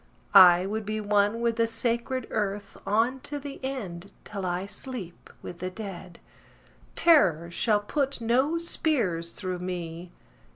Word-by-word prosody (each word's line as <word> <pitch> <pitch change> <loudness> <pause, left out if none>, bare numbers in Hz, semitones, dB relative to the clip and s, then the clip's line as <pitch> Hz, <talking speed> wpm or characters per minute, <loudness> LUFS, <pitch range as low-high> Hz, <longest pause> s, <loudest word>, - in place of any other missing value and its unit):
I 180 -2 +8
would 215 +2 -3
be 215 +1 -3
one 205 +2 +1
with 235 -1 0
the 230 0 +3
sacred 235 +2 -1
earth 205 -1 -2
On 230 +6 +2
to 290 +3 -5
the 285 -1 -8
end, 200 -9 -5
till 195 -3 -5
I 180 +2 -2
sleep 205 -5 -7
with 175 - -8
the 185 - -3
dead. 185 -3 -8 0.8
Terror 170 - +4
shall 210 +4 +2
put 275 +5 -1
no 260 +8 +2
spears 235 - -1
through 185 -1 -4
me. 175 -1 -5
210 Hz, 140 wpm, -27 LUFS, 180-245 Hz, 0.8 s, I